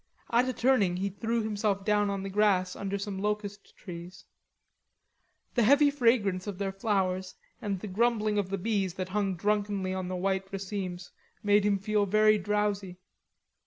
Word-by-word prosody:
At 245 +2 +3
a - - -1
turning 225 -9 +2
he 195 +2 -1
threw 225 +4 -2
himself 205 -2 -1
down 210 -1 +2
on 195 -1 -3
the 195 - -4
grass 190 -3 +2
under 200 0 -3
some 200 -1 -4
locust 205 0 -4
trees. 175 -1 -9 1.3
The 240 - +2
heavy 285 +5 +5
fragrance 225 -8 +2
of 200 -3 -4
their 195 0 -2
flowers 190 -2 -1 0.3
and 200 -3 -2
the 210 - -6
grumbling 215 +1 +1
of 195 -2 -2
the 195 - -1
bees 195 -2 -1
that 185 -1 -4
hung 195 -1 0
drunkenly 205 0 0
on 185 -1 -3
the 185 - -3
white 190 +1 -1
racemes 190 -2 -5 0.3
made 205 0 +4
him 205 -1 +2
feel 205 +1 0
very 215 +1 +4
drowsy. 205 -2 -1
200 Hz, 165 wpm, -29 LUFS, 190-210 Hz, 1.3 s, heavy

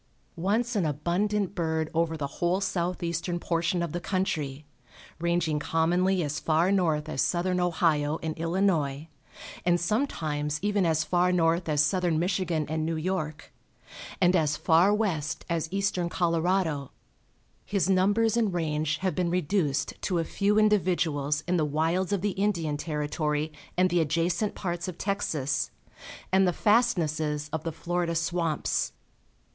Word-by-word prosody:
Once 220 +8 0
an 200 - +2
abundant 180 +7 0
bird 160 -3 -1
over 165 0 0
the 145 - -2 0.2
whole 175 +2 +2
southeastern 175 -2 -2
portion 170 +1 0
of 170 - -3
the 175 - -3
country, 155 -7 -2 0.5
ranging 170 -2 0
commonly 175 +4 +1
as 150 0 -2
far 165 +4 +2
north 160 -6 +1
as 145 -4 -1
southern 180 +1 +1
Ohio 160 -4 +1
and 160 -1 -2
Illinois, 165 -5 0 0.6
and 175 0 +3
sometimes 155 - -1
even 205 -3 +2
as 155 -1 +2
far 180 +3 +2
north 170 -1 +2
as 150 -1 +3
southern 175 0 +1
Michigan 175 -2 0
and 155 +1 -2
New 165 +1 -1
York, 160 -2 -3 0.7
and 180 0 +4
as 155 -3 +2
far 170 +5 +4
west 165 -8 -1
as 165 -1 -2
eastern 195 -3 0
Colorado, 170 -4 0 0.7
his 195 -4 0
numbers 205 +4 +3
and 220 -6 +1
range 155 -2 0
have 185 -1 0
been 180 -2 0
reduced 170 -4 0
to 180 - 0
a 165 - +1
few 205 +5 0
individuals 170 -8 +2
in 180 0 +2
the 160 - +2
wilds 165 +6 0
of 200 -3 0
the 205 +1 0
Indian 185 -7 0
Territory 150 0 -2 0.2
and 185 -1 +3
the 175 -1 +3
adjacent 170 +6 0
parts 175 -1 -3
of 180 -2 -6
Texas, 160 -9 -1 0.6
and 190 0 +4
the 180 - +1
fastnesses 160 -10 +1
of 160 -1 -2
the 165 - -2
Florida 170 +1 -2
swamps. 165 -1 -1
170 Hz, 145 wpm, -27 LUFS, 155-185 Hz, 0.7 s, and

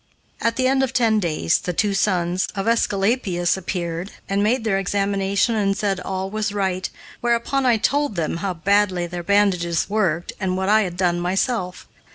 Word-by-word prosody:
At 230 0 +1
the 255 -1 +1
end 265 +1 +2
of 265 -1 -1
ten 225 -3 +3
days 155 - +1
the 180 - -3
two 205 +3 +1
sons 185 -2 +1
of 195 +2 -2
Aesculapius 200 -5 +1
appeared 175 -1 -4 0.2
and 195 +1 0
made 225 +4 +1
their 195 -3 +1
examination 200 +2 0
and 200 -2 +1
said 200 -3 -1
all 190 +1 -4
was 215 -1 -1
right, 190 -2 -1 0.3
whereupon 240 +3 0
I 235 -2 +4
told 285 +2 0
them 165 -1 -1
how 185 +1 -3
badly 190 0 +2
their 175 0 -5
bandages 180 -3 +1
worked 185 -6 0
and 185 -2 -1
what 190 +1 -1
I 215 +1 +5
had 180 -4 -3
done 175 -2 +1
myself. 180 +1 -1
195 Hz, 180 wpm, -22 LUFS, 180-215 Hz, 0.3 s, I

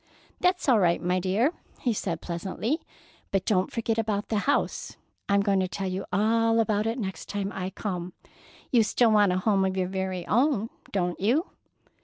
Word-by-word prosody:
"That's 360 -2 +1
all 245 -5 +5
right, 175 -3 +3
my 180 +1 0
dear," 205 - +1 0.3
he 245 - +1
said 170 -5 -3
pleasantly. 190 - -2 0.5
"But 195 -1 0
don't 185 -3 +1
forget 230 -1 -1
about 210 -2 -1
the 215 - +1
house. - - 0 0.3
I'm 200 0 +4
going 200 -1 +2
to 185 - +1
tell 195 +1 -4
you 185 +1 -3
all 225 +4 +3
about 215 -1 +1
it 230 +3 -1
next 190 -6 -5
time 200 -1 -2
I 185 -1 -3
come. 180 -3 -4 0.6
You 240 - +5
still 225 +1 +3
want 205 -3 +5
a 180 - +1
home 195 0 +2
of 190 0 0
your 185 -1 +1
very 190 -2 -3
own, 240 -2 +2 0.2
don't 180 -3 -1
you?" 255 - +1
200 Hz, 185 wpm, -27 LUFS, 185-225 Hz, 0.6 s, all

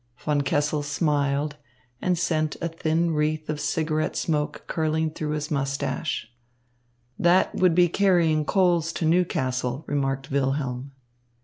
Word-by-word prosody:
Von 145 +1 0
Kessel 145 +2 0
smiled 145 -1 0 0.4
and 180 -1 +1
sent 155 -2 0
a 170 - -1
thin 165 0 0
wreath 155 0 -1
of 150 - -4
cigarette 155 +1 -1
smoke 150 -2 -1
curling 160 0 0
through 150 -1 -3
his 150 0 -3
moustache. 140 -1 -2 0.9
"That 175 +2 +4
would 180 -3 +3
be 175 0 +5
carrying 170 -4 +3
coals 175 -1 +2
to 165 - -2
Newcastle," 130 -6 0
remarked 135 -1 -2
Wilhelm. 135 -1 -1
155 Hz, 125 wpm, -25 LUFS, 140-165 Hz, 0.9 s, be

